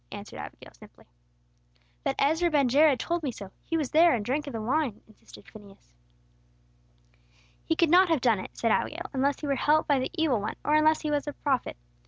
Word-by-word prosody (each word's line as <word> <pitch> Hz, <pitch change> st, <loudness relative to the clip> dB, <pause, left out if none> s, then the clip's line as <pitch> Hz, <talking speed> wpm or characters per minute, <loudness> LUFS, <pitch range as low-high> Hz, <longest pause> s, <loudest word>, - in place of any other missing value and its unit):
answered -, -, -9 dB
Abigail, -, -, -10 dB
simply. -, -, -18 dB, 1.0 s
"But 270 Hz, -, -1 dB
Ezra 320 Hz, +5 st, +2 dB
ben 290 Hz, -4 st, +2 dB
Jared 285 Hz, +1 st, +4 dB
told 345 Hz, 0 st, -2 dB
me 285 Hz, -5 st, -3 dB
so. 200 Hz, -4 st, -10 dB
He 330 Hz, -, -2 dB
was 295 Hz, -5 st, -3 dB
there, 330 Hz, -2 st, +5 dB
and 210 Hz, -3 st, -4 dB
drank 290 Hz, +5 st, -2 dB
of 280 Hz, -, -6 dB
the 225 Hz, -, -4 dB
wine," 250 Hz, 0 st, -1 dB
insisted 215 Hz, -, -17 dB
Phineas. 200 Hz, -, -16 dB, 1.7 s
"He 325 Hz, -, -1 dB
could 330 Hz, -1 st, +2 dB
not 365 Hz, +1 st, +6 dB
have 325 Hz, -3 st, +2 dB
done 230 Hz, -5 st, +2 dB
it," -, -, -10 dB
said 230 Hz, -, 0 dB
Abigail, 340 Hz, +9 st, -2 dB
"unless 275 Hz, +1 st, 0 dB
he -, -, -4 dB
were 280 Hz, -, 0 dB
helped 300 Hz, +3 st, +2 dB
by 285 Hz, -2 st, +2 dB
the 255 Hz, -, -2 dB
evil 305 Hz, -, +1 dB
one, 210 Hz, -, -4 dB
or 300 Hz, -, +1 dB
unless 310 Hz, +1 st, +3 dB
he 305 Hz, -, -3 dB
were 290 Hz, -1 st, +1 dB
a 290 Hz, -, -4 dB
prophet. 270 Hz, -4 st, -2 dB
285 Hz, 210 wpm, -27 LUFS, 245-315 Hz, 1.7 s, not